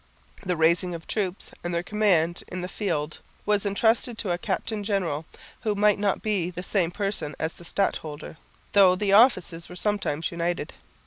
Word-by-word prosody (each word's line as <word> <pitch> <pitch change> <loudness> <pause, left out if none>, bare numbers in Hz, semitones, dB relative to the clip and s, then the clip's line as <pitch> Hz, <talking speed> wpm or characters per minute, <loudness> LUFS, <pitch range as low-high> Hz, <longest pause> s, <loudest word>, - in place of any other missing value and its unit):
The 180 -3 -1
raising 170 +2 +2
of 165 - -9
troops 195 -3 -2
and 175 0 -2
their 170 - 0
command 180 -5 +2
in 185 - -5
the 180 - -3
field 160 -7 -2 0.3
was 210 -1 +2
entrusted 225 +3 +2
to 200 -6 -2
a 175 - +1
captain 210 +3 -2
general, 175 -7 -1 0.3
who 215 -3 -1
might 205 0 +3
not 205 -1 0
be 200 -5 0
the 180 0 -6
same 180 -3 +1
person 195 -5 -2
as 160 +1 -2
the 175 - -14
stadholder, 160 -5 -2 0.4
though 190 -3 +7
the 200 +1 +1
offices 185 -7 +4
were 180 - -9
sometimes 195 -6 -1
united. 170 -2 -2
185 Hz, 175 wpm, -26 LUFS, 170-205 Hz, 0.4 s, though